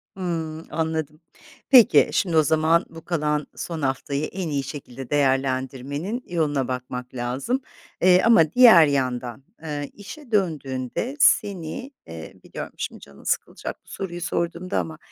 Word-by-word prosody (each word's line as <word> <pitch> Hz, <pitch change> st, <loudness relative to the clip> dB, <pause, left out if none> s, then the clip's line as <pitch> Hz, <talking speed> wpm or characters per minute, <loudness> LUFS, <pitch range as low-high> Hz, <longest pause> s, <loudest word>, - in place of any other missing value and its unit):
Hımm. 165 Hz, -3 st, -4 dB
Anladım. 160 Hz, -1 st, -3 dB, 0.5 s
Peki, 250 Hz, -3 st, +7 dB
şimdi 170 Hz, -5 st, +1 dB
o 155 Hz, -, +6 dB
zaman 160 Hz, +3 st, +3 dB
bu 165 Hz, 0 st, -12 dB
kalan 150 Hz, -3 st, -1 dB
son 165 Hz, -3 st, -5 dB
haftayı 140 Hz, +2 st, -1 dB
en 180 Hz, -2 st, -4 dB
iyi 140 Hz, -2 st, -1 dB
şekilde 135 Hz, -2 st, -8 dB
değerlendirmenin 135 Hz, -, -1 dB
yoluna 150 Hz, -6 st, 0 dB
bakmak 125 Hz, 0 st, -5 dB
lazım, 130 Hz, -, -2 dB, 0.4 s
ııı, 180 Hz, 0 st, +7 dB
ama 170 Hz, -10 st, +5 dB
diğer 230 Hz, -10 st, +8 dB
yandan, 130 Hz, -3 st, -2 dB, 0.2 s
ııı, 145 Hz, -2 st, -4 dB
işe 240 Hz, +5 st, -11 dB
döndüğünde 155 Hz, -, -1 dB
seni, 200 Hz, -, +2 dB, 0.2 s
ııı, 80 Hz, -1 st, -10 dB
biliyorum -, -, -8 dB
şimdi -, -, -5 dB
canın 70 Hz, -1 st, -15 dB
sıkılacak -, -, -3 dB
bu -, -, -20 dB
soruyu 175 Hz, -2 st, -6 dB
sorduğumda 170 Hz, +2 st, -2 dB
ama 160 Hz, -1 st, -5 dB
155 Hz, 135 wpm, -24 LUFS, 135-175 Hz, 0.5 s, diğer